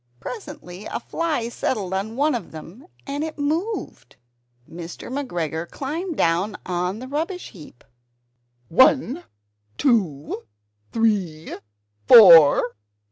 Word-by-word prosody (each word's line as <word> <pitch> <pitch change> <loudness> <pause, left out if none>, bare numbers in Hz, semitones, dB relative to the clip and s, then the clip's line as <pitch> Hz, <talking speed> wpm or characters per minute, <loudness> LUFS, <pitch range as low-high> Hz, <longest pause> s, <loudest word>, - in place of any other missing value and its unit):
Presently 290 - -9
a - - -4
fly 305 -2 -2
settled 210 -5 -3
on 200 +4 -3
one 295 +3 +1
of 230 -8 -4
them 175 - -12 0.2
and 285 +1 -3
it 320 0 -6
moved. 320 +10 -3 0.5
Mr. 170 +6 -9
McGregor 170 - -3
climbed 320 +5 -5
down 170 +5 +1
on 180 +1 -2
to - - -9
the 255 - -7
rubbish 325 +7 -4
heap 155 - -15 0.8
"One, 260 - +3 0.5
two, 165 - 0 0.4
three, 195 -9 -1 0.5
four! 165 - +8
225 Hz, 110 wpm, -22 LUFS, 175-290 Hz, 0.8 s, four